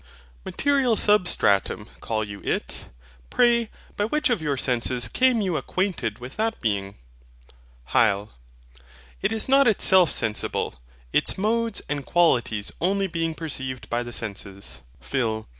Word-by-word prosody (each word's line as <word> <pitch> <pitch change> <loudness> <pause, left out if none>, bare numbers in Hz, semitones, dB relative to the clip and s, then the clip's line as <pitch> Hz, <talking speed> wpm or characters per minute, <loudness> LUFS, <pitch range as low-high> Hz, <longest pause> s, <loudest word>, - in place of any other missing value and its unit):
MATERIAL 275 -5 +2
SUBSTRATUM 175 - +2
call 110 -1 -2
you 100 -1 -8
it? - - -3 0.4
Pray, 235 - +3 0.3
by 205 - 0
which 300 +4 +1
of 225 -8 0
your 145 -3 -1
senses 125 -1 0
came 255 -3 +3
you 185 -5 0
acquainted 150 - -2
with 125 +6 -10
that 225 +1 -1
being? 100 -3 -2 1.0
HYL. 100 +1 +2 0.9
It - - +1
is 220 -1 0
not 275 0 +5
itself 190 -5 +5
sensible; 110 -1 -1 0.4
its - - +1
modes 225 +2 0
and 145 -1 -3
qualities 120 -11 +1
only 195 +3 +1
being 165 -3 -2
perceived 130 -6 -5
by 120 +1 +1
the 120 0 -6
senses. 100 - -6 0.2
PHIL. 110 - -2
155 Hz, 130 wpm, -24 LUFS, -, 1.0 s, not